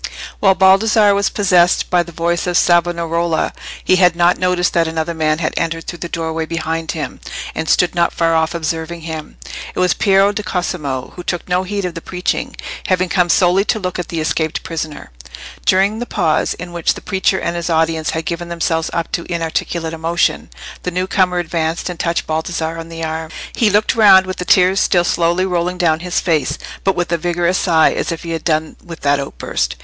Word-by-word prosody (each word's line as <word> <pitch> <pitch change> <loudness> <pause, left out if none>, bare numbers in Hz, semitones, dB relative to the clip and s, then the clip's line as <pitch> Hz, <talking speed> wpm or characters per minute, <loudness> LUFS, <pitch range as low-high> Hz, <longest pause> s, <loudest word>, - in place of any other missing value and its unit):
While 195 -2 +4
Baldassarre 205 +2 +5
was 200 0 +1
possessed 180 -3 +2
by 180 -1 +4
the 170 0 -7
voice 170 +1 -1
of 175 0 +2
Savonarola, 170 -1 +1 0.3
he 185 - +3
had 180 -2 +4
not 175 +1 +3
noticed 180 -1 +1
that 170 -2 +2
another 160 +1 -2
man 155 -1 +1
had 160 -1 -2
entered 165 0 -2
through 175 - -6
the 170 - -5
doorway 160 -1 -3
behind 165 0 -3
him, 150 -5 -5 0.3
and 160 - -3
stood 180 - +3
not 170 -1 +2
far 165 -1 +1
off 160 +1 +1
observing 165 +1 -3
him. 160 -1 -7 0.4
It - - -3
was 180 -1 +3
Piero 195 0 +3
di 205 - -3
Cosimo, 150 -9 -3
who 180 - -7
took 175 -1 -3
no 180 0 +1
heed 200 +1 -3
of 180 - -3
the 165 - -7
preaching, 180 +1 -3 0.3
having 185 -1 +1
come 180 -1 +2
solely 180 +2 +4
to - - +1
look 185 -3 -3
at 175 - -3
the 165 - -4
escaped 160 0 -1
prisoner. 155 - -6 0.6
During 195 +4 +3
the 240 - -4
pause, 155 - 0
in 180 -1 -8
which 170 -1 0
the - - -9
preacher 190 -1 0
and 170 - -2
his 170 0 -3
audience 160 -1 +1
had 160 0 -3
given 170 0 -4
themselves 165 -1 -1
up 170 0 -2
to 170 +1 -4
inarticulate 165 0 -2
emotion, 165 - 0 0.3
the - - -2
new 180 +1 -1
comer 185 -1 +1
advanced 165 0 -2
and 170 - -9
touched 170 -1 -1
Baldassarre 160 +1 -2
on 165 0 -8
the 165 0 -6
arm. 160 0 -3 0.2
He 225 - +2
looked 210 +1 +2
round 195 -4 +7
with 185 0 -5
the 180 - -4
tears 185 +1 +4
still 175 -1 +3
slowly 175 +1 +1
rolling 180 0 -1
down 160 -3 +2
his 180 +1 -1
face, 160 -5 0 0.3
but 195 - +2
with 175 -1 -2
a 170 - +2
vigorous 175 +2 0
sigh, 160 -3 +4
as - - -2
if 165 - -5
he 170 - -5
had 165 -1 -3
done 155 -1 -1
with 165 -1 -10
that 145 0 +2
outburst. 140 - -3
170 Hz, 205 wpm, -17 LUFS, 165-180 Hz, 0.6 s, round